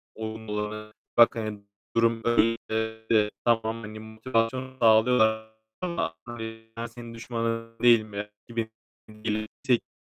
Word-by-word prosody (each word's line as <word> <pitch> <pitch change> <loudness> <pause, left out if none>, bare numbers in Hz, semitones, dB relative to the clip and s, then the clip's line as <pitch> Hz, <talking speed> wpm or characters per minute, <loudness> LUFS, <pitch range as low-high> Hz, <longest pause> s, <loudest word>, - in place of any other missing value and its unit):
olumlu 110 -1 -5
olan 110 0 -5 0.2
bak, 120 0 +8
hani, 110 -2 -4 0.3
durum 115 -1 +3
böyle 115 -1 +4
de 110 -1 +1
tamam, 115 -1 +2
hani, 110 0 -7
motivasyon 115 +4 -1
sağlıyorlar 110 -1 +4 0.3
ama 170 - -1
yani 115 -1 -7
"Ben 115 - -2
senin 115 0 -9
düşmanın 115 0 -3
değilim." 115 -3 +5 0.4
gibi 115 -1 -2 0.4
belirttikleri 110 +3 -2
115 Hz, 115 wpm, -27 LUFS, 110-115 Hz, 0.4 s, bak